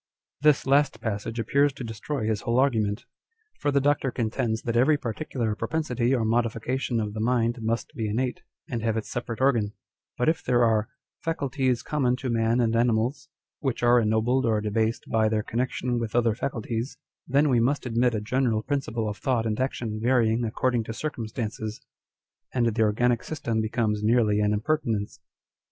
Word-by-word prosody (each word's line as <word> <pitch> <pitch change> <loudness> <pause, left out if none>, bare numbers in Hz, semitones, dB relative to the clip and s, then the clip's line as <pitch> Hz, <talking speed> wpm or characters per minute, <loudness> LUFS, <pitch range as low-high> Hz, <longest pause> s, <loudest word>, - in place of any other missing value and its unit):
l 150 - +8
This 145 - +2
last 140 -3 +3
passage 110 0 -3
appears 140 +6 +2
to 135 - -7
destroy 115 +3 -4
his^whole 110 +2 0
argu 130 -4 +3
ment. 105 +3 -3 0.5
For 145 - 0
the 140 0 +3
Doctor 140 -1 +2
contends 115 -1 -1
that 115 -1 -2
every 140 +6 +4
particular 120 -2 -3
propensity 125 0 -1
or 115 -3 0
modification 115 +2 0
of 105 -1 -2
the 110 - -5
mind 120 0 +1
must 115 +6 -2
be 115 -7 -2
innate, 125 +4 -1 0.3
and 120 -3 -3
have 115 0 0
its 110 - -4
separate 120 -2 -4
organ; 120 -6 +2 0.4
but 125 - 0
if 160 +1 +1
there 120 -1 +3
are 110 0 +2 0.2
" - - -67
faculties 135 -6 0
common 130 -5 +1
to 130 -1 -3
man 115 +1 +2
and 115 -2 +2
animals," 120 +3 +1 0.3
which 135 -4 -2
are 120 0 +6
ennobled 115 +4 +2
or 110 -2 +2
debased 110 +2 -1
by 110 -1 +2
their 110 -1 0
connection 125 +1 -1
with 115 -1 -4
other 115 -2 +3
faculties, 115 +1 -3 0.3
then 140 +3 +3
we 125 -4 +3
must 135 +5 +1
admit 120 0 +1
a 105 - -1
general 115 -1 0
principle 120 -6 -2
of 105 -1 -4
thought 125 -5 0
and 110 0 -1
action 120 -4 -2
varying 120 -1 +2
according 120 +1 0
to 115 - -5
circumstances, 110 -5 -4 0.8
and 120 -2 +2
the 115 0 +1
organic 115 +3 +2
system 120 -8 -2
becomes 110 -1 0
nearly 110 -1 +3
an 105 0 +2
impertinence. 110 -2 -1
115 Hz, 175 wpm, -26 LUFS, 110-130 Hz, 0.8 s, l